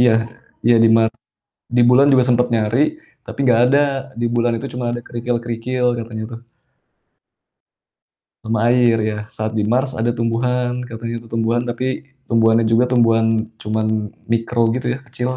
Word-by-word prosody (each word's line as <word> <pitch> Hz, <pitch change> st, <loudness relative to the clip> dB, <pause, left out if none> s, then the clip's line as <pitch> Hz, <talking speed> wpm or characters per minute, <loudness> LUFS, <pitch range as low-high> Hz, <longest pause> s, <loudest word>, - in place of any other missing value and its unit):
iya, 125 Hz, -2 st, +5 dB, 0.5 s
iya 120 Hz, 0 st, +5 dB
di 115 Hz, -, +6 dB
Mars. 110 Hz, 0 st, +2 dB, 0.6 s
Di 125 Hz, -, +5 dB
bulan 135 Hz, +3 st, +5 dB
juga 130 Hz, -, +5 dB
sempat 125 Hz, 0 st, +3 dB
nyari 115 Hz, +2 st, +1 dB, 0.5 s
tapi -, -, -10 dB
nggak 120 Hz, -2 st, +4 dB
ada. 140 Hz, +3 st, +3 dB, 0.4 s
Di 120 Hz, -, 0 dB
bulan 120 Hz, 0 st, +1 dB
itu -, -, -6 dB
cuma 125 Hz, 0 st, -4 dB
ada 120 Hz, -, -4 dB
kerikil-kerikil 120 Hz, +1 st, -3 dB
katanya 110 Hz, -1 st, -6 dB
tuh. 115 Hz, -, -8 dB, 2.0 s
Sama 110 Hz, -1 st, -1 dB
air 120 Hz, -2 st, +4 dB, 0.2 s
ya, 105 Hz, -, -5 dB, 0.2 s
saat 110 Hz, 0 st, -3 dB
di 105 Hz, -1 st, -1 dB
Mars 130 Hz, +3 st, +1 dB
ada 120 Hz, 0 st, -1 dB
tumbuhan, 125 Hz, +2 st, -1 dB
katanya 115 Hz, 0 st, -6 dB
itu 115 Hz, -, -16 dB
tumbuhan, 115 Hz, +1 st, 0 dB
tapi 130 Hz, +3 st, -4 dB, 0.2 s
tumbuhannya 115 Hz, -1 st, +3 dB
juga 120 Hz, +2 st, +4 dB
tumbuhan 115 Hz, -2 st, +3 dB, 0.3 s
cuman 110 Hz, +1 st, -1 dB, 0.5 s
mikro 115 Hz, +1 st, +1 dB
gitu 125 Hz, 0 st, -3 dB
ya, -, -, -10 dB
kecil 125 Hz, +1 st, -4 dB
120 Hz, 155 wpm, -19 LUFS, 115-125 Hz, 2.0 s, di